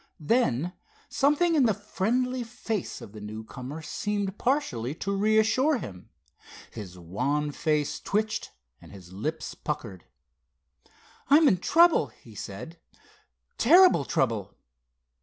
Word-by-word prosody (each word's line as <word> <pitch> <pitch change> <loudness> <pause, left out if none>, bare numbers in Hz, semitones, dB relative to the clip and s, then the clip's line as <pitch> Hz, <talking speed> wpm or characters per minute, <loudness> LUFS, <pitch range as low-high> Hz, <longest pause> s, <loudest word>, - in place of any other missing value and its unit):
Then, 175 - +1 0.4
something 300 +5 +2
in 280 -6 +4
the 215 - +2
friendly 245 +5 -1
face 225 -3 -4
of - - -10
the 105 0 -10
newcomer 125 +8 -7
seemed 205 +4 -3
partially 150 - -1
to 200 +3 -2
reassure 220 +8 +3
him. 100 - -9 0.6
His 95 -5 -9
wan 140 - -1
face 150 -1 -1
twitched 215 +2 -2 0.3
and - - -14
his 95 -2 -13
lips 155 +11 -4
puckered. 110 - -5 1.2
"I'm 300 +2 +7
in 190 - +4
trouble," 340 - +4
he 115 - -17
said—"terrible 140 - +1
trouble." 110 -8 -1
165 Hz, 110 wpm, -27 LUFS, -, 1.2 s, I'm